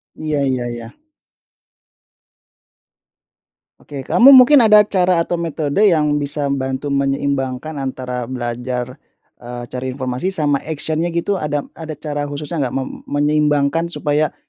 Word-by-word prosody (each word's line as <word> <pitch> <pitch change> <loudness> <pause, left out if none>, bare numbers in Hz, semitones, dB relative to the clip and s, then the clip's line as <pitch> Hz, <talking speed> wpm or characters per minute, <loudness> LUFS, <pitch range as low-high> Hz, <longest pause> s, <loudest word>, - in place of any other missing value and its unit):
Iya 155 -2 -2
iya 125 -2 -2
iya. 115 -1 -8 2.9
Oke, 140 -2 -8
kamu 265 - +7
mungkin 260 +3 +8
ada 210 -2 +6
cara 180 -4 +1
atau 175 0 -3
metode 160 -1 -2
yang 150 -4 +2
bisa 145 0 -1
bantu 135 +1 -3
menyeimbangkan 140 +1 -2
antara 125 -2 -4
belajar, 125 +1 -4 0.4
eee, 120 0 -8
cari 130 +1 -4
informasi 130 +9 -2
sama 145 -3 +1
action-nya 160 +2 -3
gitu, 185 +3 -1
ada 145 -1 -2
ada 160 -2 -8
cara 145 0 -4
khususnya 150 +3 -5
enggak, 130 -3 -2
mem 135 -1 -4
menyeimbangkan 150 +2 +1
supaya 150 -3 -1
145 Hz, 125 wpm, -18 LUFS, 130-160 Hz, 2.9 s, mungkin